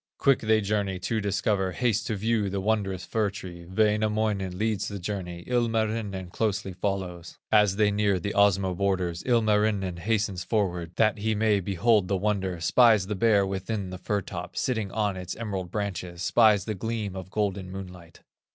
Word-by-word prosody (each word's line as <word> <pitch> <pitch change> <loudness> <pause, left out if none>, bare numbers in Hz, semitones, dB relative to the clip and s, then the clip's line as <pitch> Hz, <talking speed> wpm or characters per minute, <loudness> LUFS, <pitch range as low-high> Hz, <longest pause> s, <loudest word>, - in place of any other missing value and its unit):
Quick 135 -2 +3
they 110 0 +2
journey 100 -2 -1
to 110 +5 -2
discover, 95 -1 0
Haste 115 -2 0
to 110 - -1
view 105 0 0
the 100 +1 -2
wondrous 95 -2 -1
fir 110 -2 0
tree; 90 -3 -9
Wainamoinen 105 -1 +1
leads 110 0 -1
the 100 - -5
journey, 90 -2 -5
Ilmarinen 110 -6 -1
closely 105 -2 -1
follows. 90 -3 -4
As 105 -3 +4
they 105 0 +3
near 100 -2 +1
the 100 +3 -3
Osmo 100 -2 +3
borders, 90 -3 -1
Ilmarinen 105 -5 +2
hastens 100 -1 -1
forward 90 -6 -1
That 110 -1 +2
he 110 +1 0
may 105 -1 +2
behold 100 +2 +2
the 100 - +1
wonder, 95 -3 -1
Spies 110 +3 +5
the 105 +2 -3
Bear 100 -1 +3
within 95 0 -3
the 90 - -7
fir 100 +2 -1
top, - - -7
Sitting 110 -6 -1
on 105 -3 0
its 90 -1 -5
emerald 100 -6 -4
branches, 90 -3 -4
Spies 105 +1 +4
the 110 - -2
gleam 105 -1 -3
of 95 -1 -7
golden 100 -2 -2
moonlight. 90 -3 -10
100 Hz, 170 wpm, -27 LUFS, 95-110 Hz, -, Spies